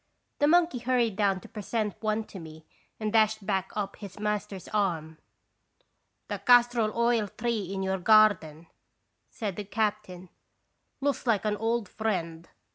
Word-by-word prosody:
The 290 - +4
monkey 335 -4 +3
hurried 240 -3 +1
down 195 -2 +1
to - - -12
present 215 -1 -3
one 215 0 0
to 200 - -11
me 160 -1 -11 0.3
and 215 -1 -2
dashed 215 -2 +3
back 190 -1 -1
up 200 -2 -3
his 200 -2 -10
master's 210 -2 -3
arm. 165 -6 -1 0.7
" - - -49
The - - -4
castor 245 -1 +5
oil 230 0 +1
tree 220 -3 -3
in 195 -1 -3
your 190 0 -1
garden," 180 -6 +4 0.6
said 205 -6 -5
the 210 - -3
captain, 205 -3 -3 0.7
"looks 280 -2 -1
like 220 -3 +2
an 210 -1 +1
old 225 0 -1
friend. 170 -6 -3
210 Hz, 150 wpm, -28 LUFS, 190-225 Hz, 0.7 s, castor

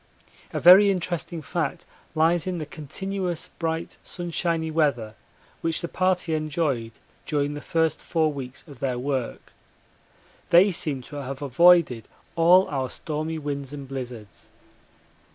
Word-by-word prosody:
A - - -2
very 190 +4 +8
interesting 175 -3 -3
fact 155 0 -3 0.3
lies 165 +2 +2
in 185 -1 -2
the 155 - -4
continuous 180 +4 -4
bright 165 -1 -3
sunshiny 170 -2 -2
weather 140 -9 0 0.5
which 165 -1 -1
the 170 - -3
party 185 -2 0
enjoyed 150 -7 -1 0.3
during 145 -1 0
the 145 - -6
first 160 -1 0
four 160 -2 +1
weeks 130 -2 -8
of 140 -5 -13
their 130 -3 -1
work. 130 -1 -3 1.0
They 185 +4 +6
seem 145 -6 -3
to 145 - -9
have 135 0 -5
avoided 145 -3 +4 0.3
all 175 +3 +6
our 130 -3 -2
stormy 155 +1 -4
winds 145 -2 -4
and 140 -2 -7
blizzards. 125 -7 -8
155 Hz, 135 wpm, -25 LUFS, 140-170 Hz, 1.0 s, very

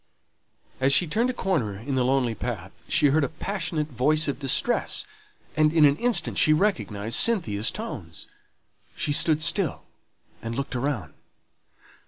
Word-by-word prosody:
As 135 +1 +2
she 145 +5 +4
turned 225 +10 0
a - - +2
corner 155 - -1
in 125 +7 -5
the 130 -1 +1
lonely 125 -2 +1
path, 110 -6 -5 0.2
she 155 -4 +3
heard 150 +2 +2
a - - -1
passionate 160 -2 -3
voice 150 +5 +1
of 140 -2 -2
distress; 135 -3 +1 0.5
and 155 0 +3
in 160 -2 +5
an 140 -1 +4
instant 225 -8 0
she 155 - +5
recognized 115 - 0
Cynthia's 115 - +2
tones. 100 - -7 0.7
She 145 - -1
stood 155 +1 +2
still 170 -1 +1 0.6
and 115 0 -5
looked 140 0 -4
around. 125 -4 -3
145 Hz, 150 wpm, -25 LUFS, 125-165 Hz, 0.7 s, in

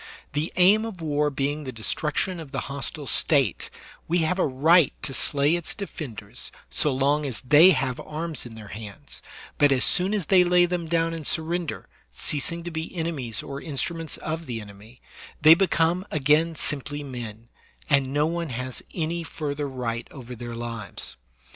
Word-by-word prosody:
The 150 +3 -1
aim 195 +4 +6
of 225 -5 -6
war 150 -2 +1
being 145 +2 -2
the 130 - -5
destruction 150 - -1
of 160 -4 -8
the - - -2
hostile 140 +1 -4
State, 135 - +2 0.4
we 175 - +2
have 180 +4 0
a - - +3
right 155 +4 +4
to 135 - -2
slay 145 +4 +2
its 175 -2 -4
defenders 150 - -7 0.2
so 150 - +1
long 140 +3 +2
as 135 -5 -3
they 150 +7 +7
have 130 -8 +1
arms 155 -2 -4
in 120 -2 -10
their 105 -2 -10
hands; 105 -2 -9 0.4
but 145 -1 +5
as 130 -2 +3
soon 190 +4 +1
as 200 -6 -1
they 185 +1 +6
lay 175 0 +5
them 175 -1 -2
down 165 0 +1
and 160 -3 -4
surrender, 170 0 -1 0.2
ceasing 165 +4 0
to 175 - -5
be 160 +2 -5
enemies 145 - -3
or 140 0 -6
instruments 160 +2 -3
of 160 +1 -4
the 120 -2 -3
enemy, 105 +3 -13 0.4
they 155 +1 +9
become 170 0 +2
again 155 +3 +2
simply 145 0 0
men, 120 -4 -7 0.4
and 140 -2 +3
no 145 +2 +2
one 170 0 -2
has 125 0 -3
any 170 0 -1
further 145 -3 -4
right 120 -3 -3
over 125 -3 -9
their 120 0 -7
lives. 115 - -5
150 Hz, 175 wpm, -25 LUFS, 130-165 Hz, 0.4 s, they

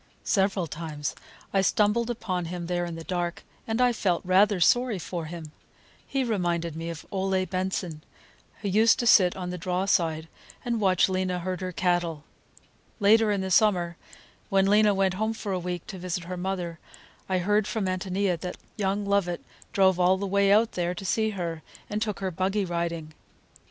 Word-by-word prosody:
Several 195 -3 +1
times 155 -2 -5 0.4
I 195 - +4
stumbled 210 +4 +2
upon 185 -7 -2
him 175 +1 -5
there 175 0 -1
in 170 -1 -5
the 165 - -7
dark, 175 0 -3 0.2
and 225 +1 -1
I 250 -1 +4
felt 185 -6 0
rather 195 +2 +4
sorry 245 +5 +3
for 170 0 -5
him. 160 -1 -8 0.6
He 270 -1 0
reminded 175 -8 -1
me 165 +1 -4
of 165 -2 -7
Ole 190 -1 0
Benson, 185 -3 -3 0.6
who - - -1
used 220 +4 +5
to 245 - -1
sit 185 -6 +6
on 180 -1 -4
the 180 - -5
draw 180 +2 -1
side 165 -5 +1 0.4
and 235 -2 -1
watch 185 -3 +4
Lena 185 -1 -1
herd 185 +1 -4
her 185 0 -3
cattle. 175 -3 0 0.8
Later 215 +1 +5
in 200 -2 0
the 190 0 -3
summer, 180 -4 +3 0.5
when 195 0 +3
Lena 210 0 +4
went 190 -1 +2
home 220 +4 -1
for 210 -2 -5
a 185 - 0
week 175 -1 -4
to 190 - -8
visit 180 -1 -3
her 180 +2 -5
mother, 180 -2 -3 0.5
I 185 - +2
heard 205 +3 +2
from 220 -3 -2
Ántonia 185 -1 -1
that 180 +2 -5 0.2
young 200 0 0
Lovett 200 -3 0 0.3
drove 190 -2 +3
all 180 +1 +4
the 200 - -3
way 200 0 +3
out 220 +2 +4
there 175 0 -2
to 195 - -7
see 220 +3 +1
her, 165 -3 -3 0.3
and 210 +1 -1
took 210 -3 -2
her 190 -1 -1
buggy 190 +3 0
riding. 170 -2 -3
185 Hz, 185 wpm, -27 LUFS, 175-200 Hz, 0.8 s, sit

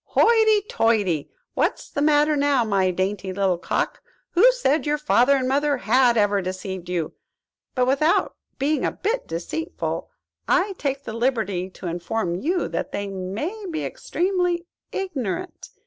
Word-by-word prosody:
"Hoity, 440 -2 +5
toity! 210 - +1 0.2
what's - - 0
the 285 - -2
matter 300 0 +4
now, 285 -3 +3
my 195 -3 +2
dainty 190 +1 -2
little 185 -2 +1
cock? - - -2 0.3
Who 455 +9 +6
said 315 - +1
your 300 0 +2
father 280 -2 +4
and 260 -2 0
mother 285 +2 +2
had 245 0 +3
ever 205 -1 +3
deceived 185 -1 -5
you? 170 -3 -2 0.6
But, 250 -1 +3
without 280 +6 +2 0.2
being 290 +3 0
a - - +1
bit 455 +5 -2
deceitful, 320 - -4 0.4
I 390 +2 +2
take 275 -1 -2
the 220 - -6
liberty 220 -7 -1
to 185 - -12
inform 175 +2 -2
you 330 - 0
that - - -3
they 200 0 -3
may 215 - -4
be 320 -2 -3
extremely 355 -1 -1 0.3
ignorant. 360 - -4
260 Hz, 150 wpm, -23 LUFS, 195-320 Hz, 0.6 s, Who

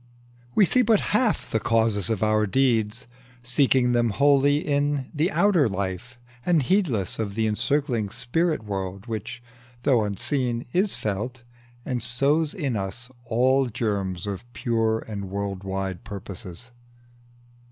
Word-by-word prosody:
We 205 - +6
see 255 +8 +4
but 225 -3 +4
half 220 +1 +1
the 110 - +1
causes 110 -3 +1
of 110 -2 0
our 110 0 +2
deeds, 115 -1 +1 0.4
Seeking 125 0 +3
them 120 -1 +2
wholly 140 +4 +4
in 145 -2 0
the 160 +3 +1
outer 195 - +3
life, 100 +6 -4 0.3
And 165 -2 +3
heedless 130 - 0
of 100 -3 -3
the 110 0 +1
encircling 120 0 0
spirit 150 - -1
world, 95 -1 -4
Which, 115 +1 -6 0.4
though 125 -6 +3
unseen, 120 +4 -1
is 190 +3 +2
felt, 110 +5 -4 0.4
and 125 -2 -2
sows 140 +7 +1
in 140 -9 -2
us 115 +6 -3
All 130 +3 +3
germs 100 -6 -2
of 100 +4 -6
pure 115 -2 0
and 100 -3 -5
world 100 -1 -4
wide 95 -2 -3
purposes. 100 +2 -8
120 Hz, 135 wpm, -25 LUFS, 105-140 Hz, 0.4 s, We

